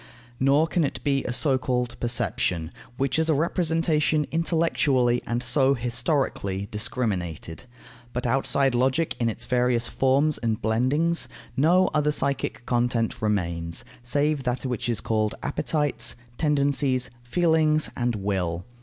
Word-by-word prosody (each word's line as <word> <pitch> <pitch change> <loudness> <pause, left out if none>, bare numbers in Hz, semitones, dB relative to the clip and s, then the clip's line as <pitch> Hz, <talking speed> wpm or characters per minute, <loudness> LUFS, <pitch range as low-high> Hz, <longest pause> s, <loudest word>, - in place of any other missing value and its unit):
Nor 140 +4 +4
can 170 0 0
it 140 - -2
be 140 -2 +1
a - - -2
so 130 +1 +3
called 125 -1 -1
perception, 95 -8 -1 0.3
which 135 +3 0
is 160 0 +1
a 155 - +3
representation 160 -1 +1
intellectually, 155 -7 +1
and 120 +1 -2
so 130 +2 +3
historically, 120 - -1
discriminated. 95 -7 -2 0.5
But 125 +1 -4
outside 135 +2 +3
logic 130 +6 +1
in 115 -1 +1
its 110 - -4
various 125 -1 +1
forms 140 +3 +2
and 115 -2 -1
blendings, 130 +7 +1 0.3
no 175 +8 +4
other 150 -1 +2
psychic 140 -4 -2
content 120 -2 0
remains, 85 -6 -2 0.2
save 145 +4 0
that 125 +1 -2
which 125 -1 -2
is 115 -5 -1
called 110 -1 0
appetites, 150 -2 -1 0.2
tendencies, 140 -3 +1
feelings, 155 +3 +2
and 120 -1 -1
will. 95 -4 -2
130 Hz, 130 wpm, -25 LUFS, 115-150 Hz, 0.5 s, Nor